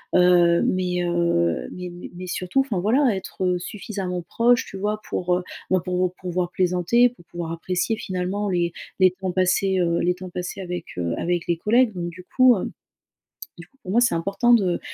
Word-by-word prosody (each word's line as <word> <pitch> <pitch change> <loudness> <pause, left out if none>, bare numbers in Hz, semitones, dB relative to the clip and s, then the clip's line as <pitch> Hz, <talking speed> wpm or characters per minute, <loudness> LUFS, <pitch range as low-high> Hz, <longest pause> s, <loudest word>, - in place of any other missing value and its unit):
heu, 175 -1 +5
mais, 180 -1 0
heu, 170 - +1
mais 180 0 -6
mais 175 0 -9
mais 180 +1 -7
surtout, 185 +8 0
enfin, 240 -9 -2
voilà, 235 +4 +3
être, 190 0 -4
heu, 180 -1 +1
suffisamment 185 -1 -5
proche, 235 +6 +2
tu 195 - -8
vois, 210 +2 -2
pour, 180 0 0
heu, 180 - -4 0.3
ben, 185 - +4
pour, 180 +1 0
heu, - - -10
pouvoir 180 -1 -2
plaisanter, 180 +7 +3
pour 230 -8 -20
pouvoir 170 -1 -6
apprécier, 180 +6 -1
finalement, 190 +2 -2
les 175 -2 0 0.3
les 185 -1 +6
temps 185 0 -4
passés, 185 +1 +2
heu, 170 -1 +1
les 180 - +2
temps 185 0 -8
passés 180 +2 -5
avec, 175 -2 -5
heu, 85 -1 -1
avec 175 -1 -1
les 170 - +1
collègues. 225 +5 +3
Donc, 175 -2 -4
du 180 +2 -12
coup, 255 -2 +7
hem, - - -4 0.9
du - - -10
coup, 270 - -34
pour 185 - -6
moi, 235 +4 +4
c'est 240 - +3
important 195 +8 +2
de, 190 -7 +3
180 Hz, 200 wpm, -23 LUFS, 175-200 Hz, 0.9 s, coup